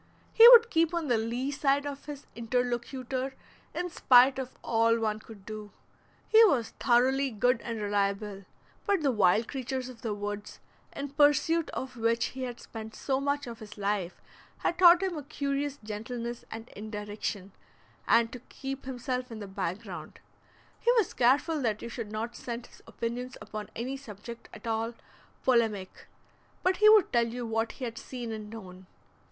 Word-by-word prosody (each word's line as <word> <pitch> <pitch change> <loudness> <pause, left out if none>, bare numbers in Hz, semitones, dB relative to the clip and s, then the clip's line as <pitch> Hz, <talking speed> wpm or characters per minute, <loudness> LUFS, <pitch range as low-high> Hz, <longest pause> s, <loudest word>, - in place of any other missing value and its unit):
He 460 +1 +10
would 470 -2 +9
keep 330 0 +2
on 325 -4 -2
the 240 - +4
lee 240 +5 -2
side 280 0 +1
of 285 -1 -6
his 290 -2 -8
interlocutor 250 +2 -2 0.4
in 355 0 -2
spite 260 0 +6
of 260 -1 -6
all 230 0 +3
one 215 -1 -1
could 215 -3 -14
do. 215 -1 -7 0.6
He 450 +1 +7
was 255 - +2
thoroughly 265 +3 +3
good 240 +2 +1
and 230 -2 -4
reliable, 200 -1 -1 0.4
but 400 -5 +2
the 275 - +3
wild 210 0 +3
creatures 260 -1 -4
of 240 -3 -12
the 220 -2 -2
woods, 205 0 -5 0.4
in 280 0 -4
pursuit 295 +3 +3
of 260 -1 -6
which 230 0 +1
he 260 - -7
had 245 -2 -4
spent 220 -1 -9
so 265 -1 -1
much 285 +1 0
of 235 -2 -8
his 215 -1 -11
life, 200 -3 -2 0.4
had 345 - -1
taught 355 0 +8
him 375 -2 -1
a - - -8
curious 280 0 -2
gentleness 235 +3 -5
and 225 +1 -8
indirection, 210 -2 -5 0.6
and 230 0 +4
to 250 - -7
keep 270 0 -6
himself 255 -1 -3
in 225 - -6
the 210 - -6
back 190 0 -3
ground; - - -9 0.6
he 480 - +3
was 450 -7 +2
careful 280 +5 +3
that 220 -4 -1
you 235 - -5
should 230 -3 -6
not 225 +2 -4
scent 235 0 -6
his - - -18
opinions 245 +2 -4
upon 215 -1 -7
any 250 +4 -3
subject 235 -3 -10
at - - -12
all 225 +1 -1 0.5
polemic, 225 -7 +1 0.6
but 370 0 +2
he 425 0 +7
would 430 -2 +6
tell 235 -1 +3
you 240 +1 -5
what 225 0 -1
he 260 - -5
had 230 -1 -5
seen 245 -3 -6
and 215 -1 -6
known. 185 -4 -10
240 Hz, 175 wpm, -29 LUFS, 220-275 Hz, 0.6 s, He